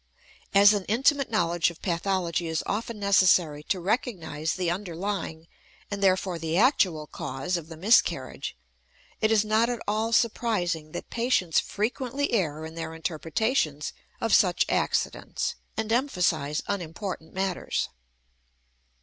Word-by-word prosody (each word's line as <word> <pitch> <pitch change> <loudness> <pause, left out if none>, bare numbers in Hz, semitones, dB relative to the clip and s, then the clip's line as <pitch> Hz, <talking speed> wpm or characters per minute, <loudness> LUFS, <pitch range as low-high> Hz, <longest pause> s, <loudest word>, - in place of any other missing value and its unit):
As 200 +1 +8
an 205 -2 -1
intimate 270 +5 +2
knowledge 175 -6 +2
of 170 - -12
pathology 175 -1 -1
is 160 -1 -1
often 225 +2 -3
necessary 185 -6 +4
to 190 - 0
recognize 170 - -1
the 180 -2 0
underlying, 175 -2 -4 0.4
and 200 -1 -3
therefore 185 -2 +2
the 165 +1 -1
actual, 185 - +3
cause 135 +4 -4
of 170 -3 -4
the 160 -1 -10
miscarriage, 170 - +2 0.6
it 220 - +2
is 215 -1 +4
not 220 +2 +3
at 240 -2 -2
all 215 +2 0
surprising 200 -9 +1
that - - -7
patients 230 -8 +2
frequently 250 +6 -2
err 160 -7 0
in 160 - -8
their 165 -1 -5
interpretations 160 - -1 0.3
of 225 -3 0
such 185 -4 +4
accidents, - - -1 0.2
and 220 0 -2
emphasize 175 - +1
unimportant 180 -2 -4
matters. 190 -1 -1
185 Hz, 130 wpm, -27 LUFS, 165-220 Hz, 0.6 s, As